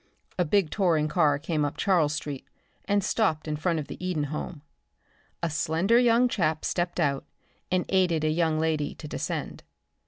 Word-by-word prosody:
A 180 - +3
big 185 0 +2
touring 165 -7 +2
car 150 -2 +3
came 155 0 -1
up 145 - -2
Charles 165 -7 +2
street 145 -3 -5 0.4
and 205 -1 +1
stopped 160 -10 0
in 155 - -1
front 165 +2 0
of 155 - -3
the - - -8
Eden 180 -5 -1
home. 150 0 -5 0.8
A 170 - +1
slender 170 +9 +2
young 245 0 +4
chap 160 -9 0
stepped 175 0 -1
out 140 -4 +1 0.5
and 185 -1 +1
aided 180 -5 +2
a 155 - +2
young 160 -1 +1
lady 155 -2 -1
to 155 - -9
descend. - - -4
160 Hz, 175 wpm, -27 LUFS, 150-185 Hz, 0.8 s, young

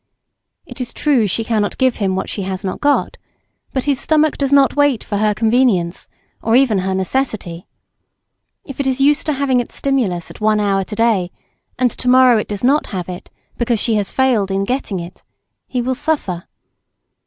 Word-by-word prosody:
It - - -8
is 245 - -5
true 270 -8 +2
she 225 +4 -1
cannot 215 -2 -1
give 260 -2 +2
him 195 -3 0
what 190 - -3
she 205 - -4
has 190 0 -4
not 190 - -4
got; 290 -1 +1 0.5
but 265 - -2
his 280 -3 +1
stomach 310 -1 +2
does 275 -1 -1
not 280 -1 +4
wait 290 -5 +2
for 205 - -3
her 210 0 +1
convenience, 220 -7 +1 0.3
or 225 +1 +1
even 245 -6 +3
her 190 +1 -1
necessity. 190 -4 -2 1.0
If 275 - -10
it 280 - 0
is 260 0 0
used 290 +3 +3
to 305 - +1
having 270 -2 +1
its 245 - -5
stimulus 230 -11 -1
at - - -14
one 215 0 +2
hour 195 -2 +1
to 210 - -7
day, 215 -6 +1 0.5
and 250 -1 +2
to 250 - -2
morrow 255 -2 +6
it - - -4
does 205 0 -5
not 280 +4 +2
have 185 -4 -5
it, 180 -1 -8 0.3
because 235 -2 +1
she 230 - +1
has 205 -2 0
failed 245 -7 +1
in 195 0 0
getting 225 -4 -2
it, 175 +2 -10 0.4
he 250 -2 -2
will 260 +2 0
suffer. 240 - -2
230 Hz, 195 wpm, -18 LUFS, 195-265 Hz, 1.0 s, morrow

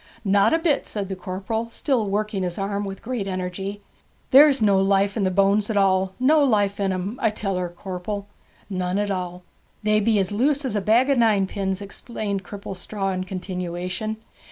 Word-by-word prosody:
'Not 200 0 +4
a 325 - +4
bit,' 325 -4 0
said 200 -3 -4
the 190 - -3
corporal, 195 +5 -4
still 235 -2 0
working 210 0 -1
his 180 -2 -2
arm 200 +1 -2
with 195 -1 -7
great 230 -4 -3
energy. 190 +2 -4 0.5
'There's 280 0 +7
no 200 -3 +4
life 195 +1 +2
in 210 -4 0
the - - +3
bones 200 +3 +2
at 215 - 0
all. 190 -1 +2
No 295 +4 +5
life 205 -6 +2
in 195 -1 +1
'em, 190 +6 -3
I 225 - +4
tell 200 -2 -2
her, 180 -1 -2
corpel!' 190 +3 -5 0.4
'None 185 -1 -2
at 205 0 0
all.' 180 -1 -4 0.4
'They 215 0 +3
be 215 +1 +2
as 190 -1 0
loose 275 +7 +1
as 245 - -2
a 205 - +1
bag 235 +7 +3
of 270 - +3
ninepins,' 200 -3 +1
explained 200 -1 -4
Cripplestraw 195 0 -4
in 185 0 -3
continuation. 185 +3 -4
200 Hz, 185 wpm, -23 LUFS, 190-215 Hz, 0.5 s, There's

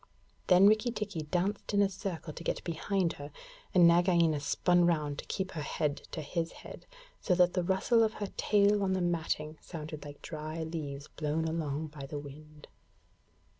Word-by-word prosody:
Then 180 +2 +7
Rikki 215 +3 +5
tikki 210 -7 -3
danced 185 +7 -1
in 200 - +5
a - - +4
circle 185 -5 -5
to 165 - -8
get - - -2
behind 170 +1 -1
her, 145 +1 -8 0.4
and 175 -2 +7
Nagaina 170 -3 +4
spun 175 +5 +3
round 150 -4 0
to - - -6
keep 190 -1 -3
her 160 - -4
head 145 0 -1
to 155 - -5
his 165 +3 -2
head, - - -11 0.3
so 180 - +1
that 180 0 +4
the 180 - +1
rustle 190 +6 +2
of 220 -1 +2
her 205 -3 -4
tail 205 0 +3
on 190 -1 +1
the 190 - 0
matting 160 -3 -1
sounded 155 -3 -7
like 145 -1 -11
dry 155 +1 -5
leaves 150 -3 -5
blown 155 +1 -2
along 155 -2 -2
by 145 -2 -8
the 145 - -5
wind. 150 +1 -11
170 Hz, 180 wpm, -31 LUFS, 150-190 Hz, 0.4 s, Then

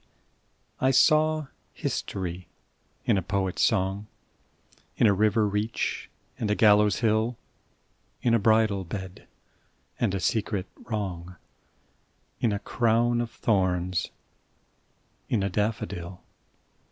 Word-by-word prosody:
SYMBOLS - - -38
I 130 - +4
saw 155 +3 +4 0.3
history 90 -2 -4 0.6
in 100 - +3
a - - -3
poet's 95 0 -1
song, 100 -1 +1 0.9
In - - +4
a 105 - +6
river 105 +2 +2
reach 105 +3 -2 0.3
and 110 - -1
a 105 - +2
gallows 105 -1 +4
hill, 110 +1 +1 0.9
In 120 - +3
a 115 - +4
bridal 110 -2 +3
bed, 95 +1 -7 0.7
and 105 -5 +1
a - - -1
secret 105 -2 -1
wrong, 90 -5 -5 1.0
In 115 - +1
a 100 - 0
crown 120 +2 +1
of 120 - -3
thorns: 95 -5 0 1.2
in 110 -5 +1
a 100 - -1
daffodil. 95 -4 -3
105 Hz, 115 wpm, -27 LUFS, 95-115 Hz, 1.2 s, a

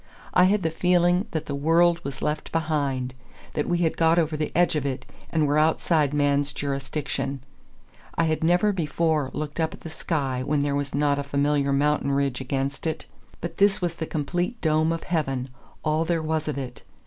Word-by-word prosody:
I 180 - +6
had 200 +1 +2
the 160 - +1
feeling 175 +2 +2
that 160 -3 -3
the 140 - -4
world 165 +4 +3
was 140 -1 -6
left 150 0 -2
behind, 140 -6 -1 0.4
that 150 - -1
we 175 - +2
had 160 - 0
got 165 0 +4
over 160 -2 +2
the 155 0 -2
edge 175 -1 +3
of 150 - 0
it, 130 -2 -3 0.2
and 160 -2 +2
were 145 +1 +2
outside 155 -1 +2
man's 145 -1 +1
jurisdiction. 140 -1 -3 0.7
I 165 - +2
had 160 -1 0
never 180 +5 +4
before 160 -5 0
looked 150 +1 -5
up 160 -1 0
at - - -20
the 165 - -8
sky 135 -6 -2
when 145 +1 +1
there 145 -1 0
was 140 0 -2
not 145 0 +2
a - - -1
familiar 140 0 +1
mountain 140 0 +2
ridge 140 -2 0
against 135 +3 -2
it. 160 -1 -3 0.4
But 170 0 -5
this 200 0 +4
was 175 -3 -1
the 165 -1 -5
complete 175 - -2
dome 155 0 +2
of 165 -1 -3
heaven, 135 -6 -1 0.3
all 155 +1 +1
there 165 -1 0
was 155 0 -1
of 150 -2 -2
it. 125 -3 -6
155 Hz, 195 wpm, -25 LUFS, 140-165 Hz, 0.7 s, I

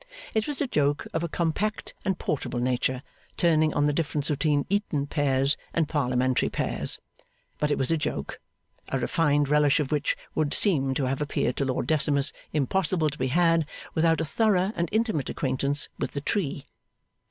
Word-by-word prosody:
It 220 -1 0
was 295 -2 -2
a 290 - +2
joke 145 - +1
of 160 - -1
a 170 - -2
compact 175 +7 -1
and 190 -2 0
portable 150 -7 -2
nature, 125 +1 0 0.3
turning 155 -2 +3
on 145 - +3
the 145 - +2
difference 150 -1 -1
between 145 0 +1
Eton 195 -8 0
pears 140 -1 +1 0.2
and 165 -2 +2
Parliamentary 130 -4 +1
pairs; - - 0 0.6
but 150 - +1
it 145 - +1
was 135 +3 0
a 165 - +3
joke, 110 - -3 0.5
a - - 0
refined 145 -3 +2
relish 150 0 +4
of 145 -2 -2
which 150 -2 0 0.2
would 150 -2 0
seem 135 -10 +2
to 135 - 0
have 135 +2 -1
appeared 150 - 0
to 140 - +1
Lord 130 -1 -1
Decimus 145 -2 +2 0.2
impossible 155 +2 +1
to 150 - -10
be 130 - +1
had 165 +2 +3 0.3
without 165 0 +3
a 160 - 0
thorough 195 +4 +2
and 170 -3 -1
intimate 220 - 0
acquaintance 140 +1 -1
with - - -3
the 140 - -3
tree. 145 -4 -2
150 Hz, 175 wpm, -26 LUFS, 140-165 Hz, 0.6 s, relish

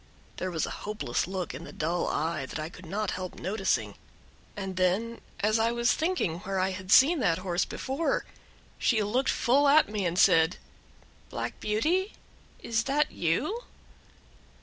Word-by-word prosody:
There 185 - -2
was 165 -3 -1
a - - -6
hopeless 210 - -2
look 185 -5 -4
in 135 +6 -7
the - - -9
dull 170 +3 -1
eye 155 -3 -1
that - - -6
I 155 +1 -4
could 180 0 -13
not 210 +5 -2
help 185 -1 -5
noticing, 180 - -1 0.6
and 190 -2 -4
then, 195 +6 0 0.2
as 215 +2 +2
I 225 +1 +2
was 235 0 +2
thinking 320 - -1
where 195 0 -4
I 190 +1 +1
had 185 0 -6
seen 305 +8 +7
that 165 -9 +2
horse 180 -1 -1
before, 275 +5 -2 0.5
she 220 -3 +2
looked 250 +6 0
full 280 +4 +3
at 295 -2 +5
me 205 -3 -1
and 170 +1 -2
said, 170 -2 +5 0.7
"Black - - -5
Beauty, 325 - 0 0.5
is 230 0 0
that 295 +2 +1
you?" 300 - -1
195 Hz, 165 wpm, -28 LUFS, 175-235 Hz, 0.7 s, seen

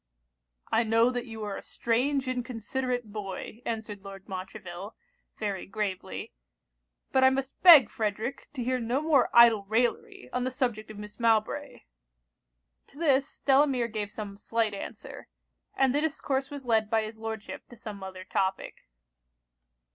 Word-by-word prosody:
'I 230 - +4
know 225 +2 +4
that 245 0 -4
you 225 -1 -7
are 205 -1 -3
a - - -6
strange 260 +4 0
inconsiderate 250 -1 -3
boy,' 210 +2 -6
answered 220 -3 -4
Lord 195 -1 -10
Montreville, 190 +1 -7 0.4
very 200 -3 -3
gravely; 195 -2 -4 0.8
'but 265 - +4
I 260 - +8
must 265 0 -3
beg, 320 - +10
Frederic, 220 +4 -3
to 250 - -2
hear 255 +1 0
no 240 +3 0
more 305 -4 +3
idle 235 -3 +7
raillery 225 - -1
on 250 - 0
the 255 - 0
subject 245 -5 -2
of 215 - -9
Miss 210 +2 -10
Mowbray.' 225 -2 +1 1.1
To - - -19
this, 280 -4 +1
Delamere 270 -3 +3
gave 210 -2 -3
some 205 -2 -7
slight 225 -2 0
answer; 200 - -8 0.5
and 265 -2 +3
the 290 - +2
discourse 275 -3 -1
was 285 -3 -8
led 220 -3 +2
by 220 0 +2
his 220 +1 -7
Lordship 220 -1 -6
to 240 - -13
some 210 -3 -8
other 190 -1 -7
topic. 190 0 -2
225 Hz, 150 wpm, -28 LUFS, 210-255 Hz, 1.1 s, beg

